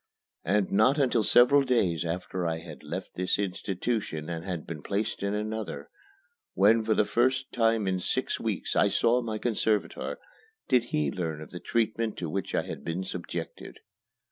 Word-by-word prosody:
And 100 Hz, +2 st, +1 dB
not 110 Hz, +8 st, +4 dB
until 130 Hz, -5 st, +3 dB
several 125 Hz, +6 st, +6 dB
days 105 Hz, -, +1 dB
after 90 Hz, +1 st, -2 dB
I 80 Hz, 0 st, -1 dB
had 80 Hz, -1 st, -10 dB
left -, -, -6 dB
this 90 Hz, +1 st, 0 dB
institution 95 Hz, -3 st, -2 dB
and 85 Hz, -1 st, -4 dB
had 90 Hz, -4 st, -4 dB
been 80 Hz, -3 st, -6 dB
placed 105 Hz, +6 st, -2 dB
in 100 Hz, +1 st, -1 dB
another, 110 Hz, +1 st, -4 dB, 0.6 s
when 110 Hz, +3 st, +5 dB
for 110 Hz, 0 st, +2 dB
the 105 Hz, -, +3 dB
first 130 Hz, +4 st, +1 dB
time 115 Hz, -3 st, +2 dB
in 95 Hz, -1 st, +1 dB
six -, -, -1 dB
weeks -, -, -2 dB
I -, -, +5 dB
saw 120 Hz, +2 st, +3 dB
my 110 Hz, -2 st, -3 dB
conservator, 110 Hz, -2 st, -1 dB, 0.5 s
did 125 Hz, -3 st, +3 dB
he 75 Hz, -10 st, 0 dB
learn 80 Hz, -3 st, -3 dB
of 80 Hz, -, -10 dB
the 90 Hz, -, -6 dB
treatment 115 Hz, 0 st, -1 dB
to 85 Hz, -3 st, -4 dB
which 95 Hz, 0 st, -2 dB
I -, -, +1 dB
had -, -, -7 dB
been 85 Hz, +3 st, -2 dB
subjected. 85 Hz, -2 st, -6 dB
100 Hz, 170 wpm, -28 LUFS, 90-115 Hz, 0.6 s, several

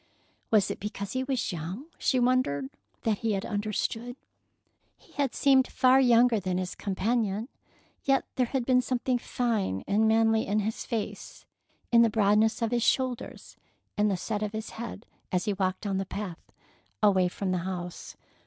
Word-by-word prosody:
Was 210 Hz, -4 st, +3 dB
it -, -, -6 dB
because 200 Hz, -1 st, -5 dB
he 260 Hz, 0 st, -1 dB
was 260 Hz, -4 st, -1 dB
young, 180 Hz, -, -5 dB
she 260 Hz, -, +2 dB
wondered, 240 Hz, -, +1 dB, 0.3 s
that 215 Hz, -3 st, +1 dB
he 225 Hz, -2 st, 0 dB
had 195 Hz, 0 st, -2 dB
understood? 215 Hz, +3 st, -2 dB, 0.8 s
He -, -, -24 dB
had 280 Hz, -3 st, -1 dB
seemed 270 Hz, -2 st, +4 dB
far 260 Hz, +1 st, +4 dB
younger 240 Hz, -2 st, +5 dB
than 185 Hz, -1 st, -2 dB
his 185 Hz, -1 st, -3 dB
companion, 210 Hz, +3 st, -1 dB, 0.5 s
yet 270 Hz, -1 st, +2 dB
there 250 Hz, -2 st, +1 dB
had 260 Hz, -1 st, -2 dB
been 250 Hz, 0 st, +4 dB
something 250 Hz, 0 st, 0 dB
fine 220 Hz, -, -1 dB
and 215 Hz, +2 st, +3 dB
manly 225 Hz, 0 st, +3 dB
in 210 Hz, +2 st, +1 dB
his 220 Hz, +2 st, -3 dB
face, 225 Hz, -3 st, -5 dB, 0.5 s
in 235 Hz, -1 st, +7 dB
the 230 Hz, -, +5 dB
broadness 215 Hz, +2 st, +2 dB
of 230 Hz, -, 0 dB
his 240 Hz, -1 st, +1 dB
shoulders, 255 Hz, 0 st, -1 dB, 0.4 s
and 210 Hz, 0 st, +2 dB
the 195 Hz, -, 0 dB
set 210 Hz, +3 st, -3 dB
of 210 Hz, 0 st, -2 dB
his 220 Hz, 0 st, -5 dB
head, 230 Hz, -1 st, -7 dB, 0.3 s
as 180 Hz, -1 st, 0 dB
he 210 Hz, -, +1 dB
walked 185 Hz, -1 st, -1 dB
down 195 Hz, -2 st, -1 dB
the 195 Hz, -, -2 dB
path, 185 Hz, -5 st, -7 dB, 0.5 s
away 190 Hz, -3 st, +5 dB
from 185 Hz, +1 st, -3 dB
the 180 Hz, -, 0 dB
house. 180 Hz, -1 st, -6 dB
220 Hz, 170 wpm, -28 LUFS, 195-245 Hz, 0.8 s, in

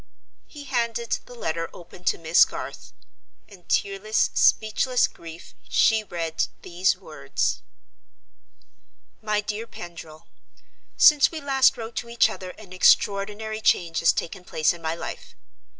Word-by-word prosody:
He 295 Hz, -2 st, -11 dB
handed 235 Hz, -3 st, -1 dB
the 245 Hz, -, -12 dB
letter 165 Hz, -7 st, -3 dB
open 175 Hz, +1 st, -14 dB
to -, -, +2 dB
Miss 165 Hz, +1 st, +5 dB
Garth. -, -, -6 dB, 0.6 s
In 185 Hz, -4 st, -17 dB
tearless, 200 Hz, +2 st, 0 dB
speechless 245 Hz, +4 st, +3 dB
grief, 165 Hz, 0 st, -12 dB, 0.2 s
she 220 Hz, -1 st, +3 dB
read 165 Hz, -4 st, -2 dB, 0.2 s
these 180 Hz, +2 st, +1 dB
words: -, -, -3 dB, 1.6 s
"MY 210 Hz, -1 st, 0 dB
DEAR 215 Hz, +2 st, -5 dB
PENDRIL—Since 175 Hz, -, 0 dB
we 325 Hz, -, -6 dB
last 270 Hz, -2 st, +3 dB
wrote 225 Hz, 0 st, -7 dB
to 235 Hz, -, -4 dB
each 235 Hz, 0 st, +3 dB
other 185 Hz, -, -8 dB
an 200 Hz, -4 st, -13 dB
extraordinary 210 Hz, +3 st, +2 dB
change 170 Hz, -5 st, +2 dB
has 165 Hz, -, +5 dB
taken 180 Hz, +2 st, -5 dB
place 160 Hz, -2 st, +1 dB
in 170 Hz, -, -12 dB
my 160 Hz, 0 st, -2 dB
life. -, -, -8 dB
205 Hz, 130 wpm, -24 LUFS, 170-230 Hz, 1.6 s, Miss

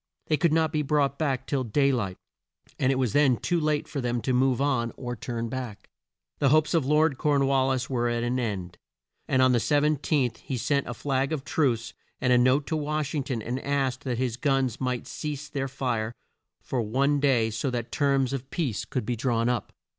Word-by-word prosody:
They 155 Hz, -, +1 dB
could 170 Hz, 0 st, +2 dB
not 160 Hz, -1 st, +2 dB
be 155 Hz, -, +1 dB
brought 140 Hz, -1 st, +1 dB
back 140 Hz, -5 st, 0 dB
till 135 Hz, -3 st, -1 dB
day 140 Hz, +4 st, +2 dB
light 100 Hz, -8 st, -2 dB, 0.6 s
and 135 Hz, 0 st, +3 dB
it -, -, +1 dB
was 125 Hz, -5 st, 0 dB
then 140 Hz, -4 st, +4 dB
too 175 Hz, -1 st, 0 dB
late 150 Hz, -1 st, 0 dB
for 140 Hz, -, -4 dB
them 120 Hz, -1 st, -1 dB
to 130 Hz, -, 0 dB
move 130 Hz, 0 st, +2 dB
on 130 Hz, -5 st, +1 dB
or 120 Hz, -2 st, -4 dB
to -, -, -21 dB
turn 115 Hz, -2 st, -3 dB
back. 120 Hz, -3 st, -6 dB, 0.5 s
The 140 Hz, -, +4 dB
hopes 155 Hz, +3 st, +3 dB
of 160 Hz, -6 st, +2 dB
Lord 150 Hz, -1 st, +3 dB
Corn 145 Hz, -2 st, +2 dB
wal 135 Hz, -1 st, +2 dB
lis 130 Hz, -1 st, 0 dB
were 120 Hz, -2 st, 0 dB
at 120 Hz, 0 st, -1 dB
an 125 Hz, +1 st, 0 dB
end, 95 Hz, -7 st, -4 dB, 0.5 s
and 130 Hz, -1 st, +3 dB
on 130 Hz, -, +5 dB
the 120 Hz, -, +3 dB
17th 145 Hz, -3 st, +1 dB
he 130 Hz, -, -5 dB
sent 140 Hz, +4 st, 0 dB
a 120 Hz, -, -4 dB
flag 135 Hz, +1 st, -1 dB
of 150 Hz, -4 st, -2 dB
truce 120 Hz, -7 st, 0 dB, 0.3 s
and 125 Hz, -1 st, +3 dB
a -, -, +6 dB
note 130 Hz, +4 st, +3 dB
to 160 Hz, -, -2 dB
Wash 150 Hz, -1 st, -2 dB
ing 145 Hz, -4 st, -1 dB
ton 120 Hz, -6 st, -3 dB
and 125 Hz, +4 st, -3 dB
asked 135 Hz, -1 st, -1 dB
that 125 Hz, -3 st, -1 dB
his 120 Hz, -2 st, -1 dB
guns 135 Hz, -4 st, 0 dB
might 125 Hz, -2 st, -1 dB
cease 150 Hz, -1 st, -5 dB
their 135 Hz, -1 st, -3 dB
fire 120 Hz, -4 st, -2 dB, 0.5 s
for 125 Hz, -, -1 dB
one 135 Hz, +6 st, +1 dB
day 125 Hz, -6 st, +2 dB
so 115 Hz, +5 st, -2 dB
that 120 Hz, -2 st, -4 dB
terms 140 Hz, -2 st, +1 dB
of 135 Hz, 0 st, -5 dB
peace 140 Hz, -, -2 dB
could 125 Hz, -5 st, -3 dB
be 120 Hz, -, -1 dB
drawn 115 Hz, 0 st, 0 dB
up. 125 Hz, -2 st, -2 dB
130 Hz, 220 wpm, -27 LUFS, 120-145 Hz, 0.6 s, a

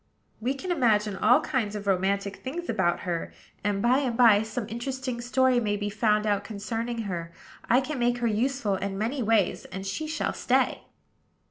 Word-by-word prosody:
"We 250 Hz, +5 st, -1 dB
can 360 Hz, +7 st, -4 dB
imagine 215 Hz, -, +2 dB
all 245 Hz, +9 st, +4 dB
kinds 240 Hz, -10 st, -1 dB
of 205 Hz, -1 st, -5 dB
romantic 200 Hz, +1 st, 0 dB
things 340 Hz, +7 st, -6 dB
about 175 Hz, -2 st, +1 dB
her; 175 Hz, -2 st, -3 dB, 0.3 s
and, 200 Hz, -1 st, 0 dB
by 250 Hz, +3 st, +4 dB
and 250 Hz, -5 st, -1 dB
by, 225 Hz, -5 st, +6 dB
some 220 Hz, +1 st, -4 dB
interesting 255 Hz, +1 st, -4 dB
story 255 Hz, +1 st, +3 dB
may 210 Hz, -3 st, 0 dB
be 205 Hz, 0 st, -3 dB
found 210 Hz, 0 st, +2 dB
out 205 Hz, -1 st, +1 dB
concerning 225 Hz, +3 st, -4 dB
her. 170 Hz, -4 st, -4 dB, 0.4 s
I 250 Hz, +3 st, +5 dB
can 280 Hz, 0 st, -4 dB
make 240 Hz, 0 st, +2 dB
her 240 Hz, -, -2 dB
useful 230 Hz, 0 st, 0 dB
in 195 Hz, 0 st, -3 dB
many 235 Hz, +6 st, -1 dB
ways; 220 Hz, -3 st, +1 dB
and 190 Hz, 0 st, -7 dB
she 200 Hz, +11 st, -3 dB
shall 315 Hz, -, -2 dB
stay." -, -, +1 dB
225 Hz, 180 wpm, -27 LUFS, 205-255 Hz, 0.4 s, by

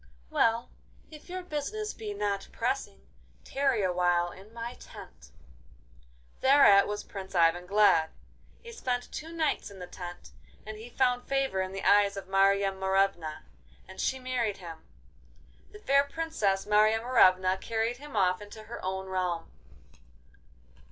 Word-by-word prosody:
'Well, 230 Hz, +1 st, +1 dB, 0.4 s
if 305 Hz, +3 st, -13 dB
your 370 Hz, 0 st, -5 dB
business 365 Hz, +7 st, -4 dB
be 215 Hz, -2 st, -6 dB
not 200 Hz, -1 st, -2 dB
pressing, 65 Hz, 0 st, -3 dB, 0.4 s
tarry 270 Hz, -6 st, 0 dB
awhile 175 Hz, -1 st, +1 dB
in 195 Hz, +4 st, -14 dB
my 235 Hz, +1 st, -6 dB
tent.' 65 Hz, -, -13 dB, 1.1 s
Thereat 260 Hz, -8 st, +6 dB
was 210 Hz, 0 st, -4 dB
Prince 195 Hz, -2 st, -9 dB
Ivan 175 Hz, +1 st, +3 dB
glad. 195 Hz, -5 st, +4 dB, 0.5 s
He 470 Hz, -, -9 dB
spent 250 Hz, -, -3 dB
two 320 Hz, +2 st, -7 dB
nights 320 Hz, -8 st, -1 dB
in 200 Hz, -, -13 dB
the 180 Hz, -, -7 dB
tent, 175 Hz, -, -9 dB, 0.3 s
and 215 Hz, 0 st, -7 dB
he 230 Hz, +2 st, -10 dB
found 250 Hz, 0 st, 0 dB
favour 270 Hz, -8 st, 0 dB
in 185 Hz, 0 st, -3 dB
the 195 Hz, 0 st, -6 dB
eyes 200 Hz, -1 st, +4 dB
of 195 Hz, -, -7 dB
Marya 195 Hz, +1 st, +3 dB
Morevna, 190 Hz, -4 st, 0 dB, 0.4 s
and 190 Hz, -, -7 dB
she 265 Hz, -, 0 dB
married 250 Hz, -5 st, -2 dB
him. 165 Hz, -3 st, -9 dB, 0.9 s
The -, -, -11 dB
fair 280 Hz, -9 st, +3 dB
Princess, 285 Hz, -11 st, -1 dB
Marya 215 Hz, +1 st, +4 dB
Morevna, 185 Hz, -6 st, +4 dB
carried 230 Hz, +1 st, -1 dB
him 290 Hz, -1 st, -11 dB
off 185 Hz, -1 st, +2 dB
into 210 Hz, +1 st, -10 dB
her 235 Hz, +2 st, -9 dB
own 190 Hz, +1 st, -3 dB
realm. 180 Hz, -3 st, -2 dB
205 Hz, 145 wpm, -29 LUFS, 190-250 Hz, 1.1 s, Thereat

